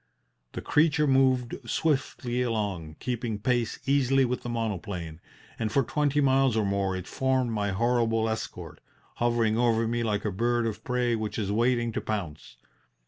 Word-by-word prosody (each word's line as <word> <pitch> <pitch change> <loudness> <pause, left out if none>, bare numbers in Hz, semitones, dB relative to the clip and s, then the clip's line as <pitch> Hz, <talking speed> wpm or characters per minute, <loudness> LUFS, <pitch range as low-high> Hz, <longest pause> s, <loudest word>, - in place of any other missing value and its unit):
The - - -6
creature 150 0 +3
moved 130 -3 +3 0.2
swiftly 130 -5 0
along, 100 -10 -2
keeping 120 -3 -3
pace 120 +1 0
easily 135 -1 +3
with 125 0 -2
the 120 - -6
monoplane, 95 -8 -4 0.4
and 110 -2 -1
for 140 - +3
twenty 150 +3 0
miles 135 -3 +3
or 110 - +2
more 100 -1 0
it 95 -1 -5
formed 130 0 0
my 105 -2 -1
horrible 115 +2 +1
escort, 110 0 -5 0.4
hovering 115 -2 +1
over 115 -2 +2
me 120 +1 -1
like 105 -2 -1
a 105 - 0
bird 120 +4 0
of 110 -2 -4
prey 125 -1 0
which 110 -2 -4
is 100 -3 -1
waiting 120 +2 +1
to - - -3
pounce. 80 - -5
115 Hz, 160 wpm, -27 LUFS, 105-125 Hz, 0.4 s, creature